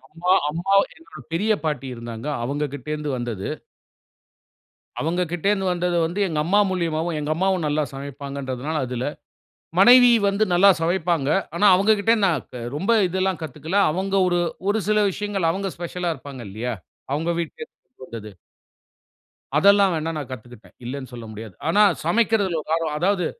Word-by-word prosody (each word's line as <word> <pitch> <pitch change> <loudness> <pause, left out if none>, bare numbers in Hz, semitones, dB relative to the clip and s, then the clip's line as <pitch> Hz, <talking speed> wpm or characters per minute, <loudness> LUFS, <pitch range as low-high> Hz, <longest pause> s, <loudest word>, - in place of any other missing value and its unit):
அம்மா, 175 +3 -1 0.2
அம்மா 175 +6 -1 0.2
என்னோட 330 - -14
பெரிய 205 +6 +1
பாட்டி 145 -4 -2
இருந்தாங்க. 115 +1 -7 0.2
அவங்க 145 +4 -2
கிட்ட 140 +1 -9
இருந்து 150 -1 -4
வந்தது. 120 -5 -4 1.5
அவங்கக்கிட்ட 175 +2 -2
இருந்து 195 -2 0
வந்தது 175 0 -1
வந்து 180 +5 -4
எங்க 160 -3 -2
அம்மா 200 +5 +3
மூலியமாவும், 170 -2 -1
எங்க 150 - -3
அம்மாவும் 190 -2 +1
நல்லா 150 +1 +1
சமைப்பாங்கன்றதுனால 140 +1 -5
அதில. 125 0 -4 0.8
மனைவி 245 +4 +8 0.2
வந்து 200 +2 +2
நல்லா 195 +3 +6
சமைப்பாங்க. 165 -4 0 0.3
ஆனா 205 - +2
அவங்கக்கிட்ட 210 +3 +3
நான் 165 -8 0
க 125 - -6 0.2
ரொம்ப 195 +9 0 0.2
இதெல்லாம் 190 0 -1
கத்துக்கல. 160 +4 -5 0.2
அவங்க 190 +4 -2
ஒரு 175 -1 +1 0.3
ஒரு 220 - +2
சில 210 0 +3
விஷயங்கள் 200 -4 -1
அவங்க 195 +2 -3
ஸ்பெஷலா 175 0 -3
இருப்பாங்க 135 -2 -10
இல்லையா? 115 +5 -4 0.4
அவங்க 160 +4 -1
வீட்டுல 170 - -8
இருந்து 255 - -17
வந்தது. 110 -2 -8 1.3
அதெல்லாம் 200 +2 +5
வேணா 160 +1 -2
நான் 140 - -6
கத்துக்குட்டேன். 120 -2 -11
இல்லன்னு 130 0 -6
சொல்ல 120 -2 -8
முடியாது. 110 -2 -9
ஆனா 205 +5 +4 0.2
சமைக்கறதுல 200 -2 +2
ஒரு - - -12
ஆர்வம். 165 -2 -1
அதாவது 180 0 +1
165 Hz, 150 wpm, -23 LUFS, 140-195 Hz, 1.5 s, மனைவி